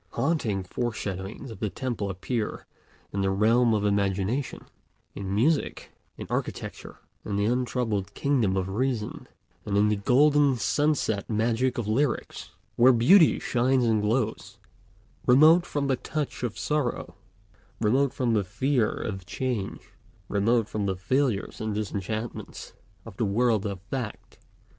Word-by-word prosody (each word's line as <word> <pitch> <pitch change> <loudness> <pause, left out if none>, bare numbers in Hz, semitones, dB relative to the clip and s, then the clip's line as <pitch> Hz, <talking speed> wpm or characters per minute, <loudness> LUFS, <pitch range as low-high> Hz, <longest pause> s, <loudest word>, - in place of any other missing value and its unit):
Haunting 120 - 0
foreshadowings 105 +2 -4
of 105 - -10
the 105 - -1
temple 120 -4 -3
appear 105 +4 -3 0.5
in 100 - -1
the 95 - +1
realm 115 +4 +3
of 105 -1 0
imagination, 100 +5 -1 0.5
in 100 0 -4
music, 145 +8 0 0.3
in - - -6
architecture, - - -5 0.3
in 100 - -3
the 100 0 +1
untroubled 115 -4 -1
kingdom 120 -9 +1
of 95 -1 -1
reason, 110 +2 -2 0.4
and 100 -1 -1
in 105 +1 +4
the 105 - +2
golden 140 +6 +4
sunset 125 -4 0
magic 115 +3 0
of 115 -3 -2
lyrics, 130 +6 -1 0.3
where 125 +2 +7
beauty 145 +9 +6
shines 125 +1 +1
and 110 -2 +2
glows, 110 +1 -1 0.7
remote 155 +7 +6
from 145 -1 -2
the 135 -2 +1
touch 150 +1 -4
of 120 -3 -3
sorrow, 150 -5 -2 0.7
remote 130 +5 +2
from 120 -3 0
the 105 -2 +2
fear 115 +4 +1
of 95 -4 -5
change, 115 0 -4 0.4
remote 110 +2 +1
from 105 -2 -2
the 95 - 0
failures 120 +2 -1
and 110 -1 -2
disenchantments 105 +2 -5 0.3
of 110 -5 -11
the 115 - +1
world 110 0 +1
of 100 -2 -5
fact. 110 +2 -6
115 Hz, 140 wpm, -26 LUFS, 100-130 Hz, 0.7 s, where